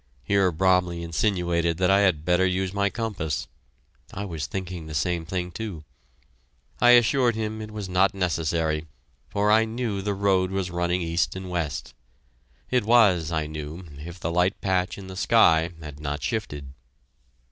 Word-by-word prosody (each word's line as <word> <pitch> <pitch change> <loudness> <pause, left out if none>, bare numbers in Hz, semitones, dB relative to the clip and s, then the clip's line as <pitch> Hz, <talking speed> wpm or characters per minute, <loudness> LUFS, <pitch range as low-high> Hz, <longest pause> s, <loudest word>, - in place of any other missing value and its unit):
Here 95 +5 +2
Bromley 90 0 +2
insinuated 85 -1 0
that 90 +1 +3
I 100 - +5
had 90 -7 +2
better 90 +1 +3
use 95 0 0
my 100 0 +1
compass 95 - -3 0.6
(I 100 - -5
was 80 -8 -4
thinking 90 +1 -5
the 75 - -6
same 85 +3 0
thing, 90 0 -3
too). 100 -6 -6 1.0
I 120 0 +7
assured 120 0 +3
him 110 0 -3
it 110 - -7
was 105 -2 -6
not 95 +2 +2
necessary, 80 -3 -1 0.4
for 105 +1 +1
I 110 +1 +5
knew 110 -3 -3
the 100 +1 -2
road 95 -2 +2
was 95 -2 -2
running 85 +1 0
east 85 +2 0
and 95 -1 -6
west. 80 -6 -3 0.8
It 125 -3 +2
was, 100 -8 +4
I 80 -2 0
knew, 75 +3 -7
if 85 +3 -9
the 85 - -2
light 90 +3 +1
patch 90 -2 0
in 100 - -9
the 95 0 -8
sky 90 -6 +4
had 75 -2 -9
not 75 -1 -4
shifted. 75 -8 -4
90 Hz, 165 wpm, -25 LUFS, 80-100 Hz, 1.0 s, I